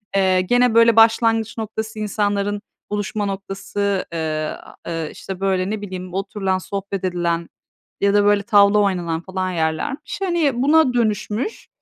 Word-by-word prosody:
Eee, 190 -1 +3
gene 245 +5 +3
böyle 230 -1 +6
başlangıç 225 0 +4
noktası, 220 0 -5
insanların 205 -1 -1 0.3
buluşma 205 0 -2
noktası, 195 0 -2
eee, 155 -2 -2 0.3
eee, 165 -2 -3
işte, 190 -2 -8
böyle, 190 -1 0
ne 215 0 -3
bileyim, 185 -2 -7
oturulan, 195 0 -1
sohbet 195 0 -5
edilen 170 -2 -1 0.5
ya 200 0 +3
da 205 0 +4
böyle, 205 -1 +3
tavla 200 0 +5
oynanan 175 -5 0
falan 185 0 -3
yerlermiş. 170 - -2
Hani, 320 -9 +1
buna 300 -2 +4
dönüşmüş. 220 - -1
200 Hz, 135 wpm, -21 LUFS, 185-220 Hz, 0.5 s, böyle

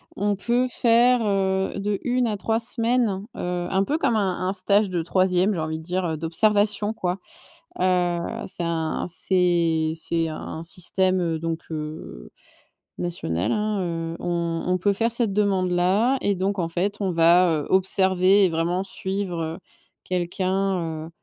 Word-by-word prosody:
On 205 +1 0
peut 240 +5 +1
faire, 245 +1 +4
heu, 190 -1 0
de 200 0 -1
1 250 -1 +1
à 210 -2 -2
3 225 +3 0
semaines, 230 -4 0
heu, 180 0 -3
un 190 0 +2
peu 290 +9 0
comme 235 - +1
un 195 -4 0
un - - -1
stage 200 +2 +2
de 175 -2 -1
troisième, 185 +3 +2
j'ai 175 - -3
envie 160 0 -3
de - - -11
dire, 180 +2 -2
heu, 160 -2 -2
d'observation, 205 +5 +2
quoi. 180 -4 -2 0.6
Heu, 180 -2 +2 0.3
c'est 180 - -3
un 165 -1 -1
c'est 170 -3 +1
c'est 165 0 -1
un 160 +1 -6
système 180 -1 0
donc 165 0 -3
heu, 150 - -7 0.7
national 90 - -2
hein, 210 -1 -1
heu, 165 -1 -3
on 170 -1 -2
on 180 0 +2
peut 200 +3 +1
faire 230 +4 0
cette 235 -3 0
demande-là 195 +4 +2
et 200 - +1
donc 195 +2 -1
en 170 - 0
fait, 185 +5 -1
on 195 -3 0
va, 170 +2 +5
heu, - - -7
observer 190 +1 +3
et - - +2
vraiment 170 +3 -1
suivre, 190 -3 -3
heu, 160 +1 -4 0.5
quelqu'un, 185 -2 -1
heu, - - -11
185 Hz, 160 wpm, -24 LUFS, 170-205 Hz, 0.7 s, va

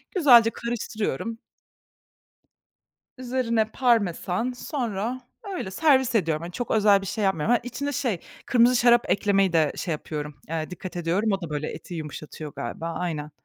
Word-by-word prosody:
Güzelce 245 -10 +7
karıştırıyorum. 230 - -3 1.8
Üzerine 245 -3 0
parmesan, 225 -2 +1
sonra, 245 -2 -3 0.3
öyle 265 - -4
servis 265 +2 +3
ediyorum. 165 -7 +1
Hani, 175 +1 -7
çok 245 +5 -4
özel 205 -2 +5
bir 195 - -7
şey 215 +2 -2
yapmıyorum. 190 0 +1
Hani, 245 - +4
içine 265 +4 -4
şey, 250 - -1 0.3
kırmızı 245 0 +4
şarap 240 0 +4
eklemeyi 195 -2 +2
de 160 -3 +3
şey 175 - -2
yapıyorum, 150 -1 -5
eee, 160 0 -3
dikkat 180 0 -7
ediyorum. 180 +6 0
O 195 - 0
da 165 - -5
böyle, 150 0 -2
eti 175 - -9
yumuşatıyor 155 -1 -7
galiba. 165 +8 -4
Aynen. 160 -3 -3
205 Hz, 145 wpm, -25 LUFS, 165-240 Hz, 1.8 s, Güzelce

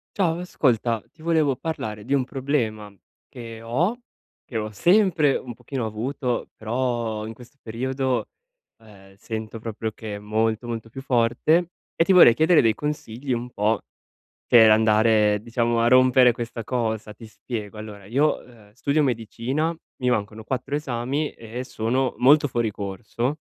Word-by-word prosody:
Ciao 170 -4 +1
ascolta, 120 - 0
ti 165 - -22
volevo 155 -5 +2
parlare 110 -9 -5
di 135 +6 -2
un 135 -2 +2
problema 120 -7 -2 0.4
che 115 -2 -9
ho, 160 - 0 0.5
che 120 - -5
ho 110 -1 -2
sempre 170 - +3
un 125 - -8
pochino 125 +1 -5
avuto 120 +3 -3
però 115 -2 -2
in 110 - -6
questo 125 +4 -16
periodo, 130 +3 -2 0.5
ehm, 95 -3 -17
sento 110 +2 -6
proprio 110 0 -4
che 110 -2 -7
è - - -7
molto, 110 +2 -1
molto 115 -1 -5
più 135 - -8
forte 135 +7 +2 0.3
e - - +4
ti 170 - +1
vorrei 180 -10 +8
chiedere 160 +6 +4
dei 115 -2 +3
consigli, 135 -1 -4
un 120 0 -2
po' 110 +1 0 0.6
per 115 -2 +7
andare, 110 -1 +4
diciamo, 115 +1 0
a 115 - +3
rompere 130 0 +6
questa 115 0 -6
cosa. 110 -3 -2
Ti 115 +2 -12
spiego: 110 -1 -7
allora, 105 -2 -9
io, 140 +8 +1
uhm, 110 -4 -19
studio 140 +6 +1
medicina, 130 +6 -1 0.3
mi 125 - +2
mancano 110 -1 -2
4 130 +4 -4
esami 140 +1 -2
e 115 +2 -7
sono 125 +1 -1
molto 145 +3 +5
fuori 120 -3 -1
corso 105 +7 -3
120 Hz, 155 wpm, -24 LUFS, 110-135 Hz, 0.6 s, vorrei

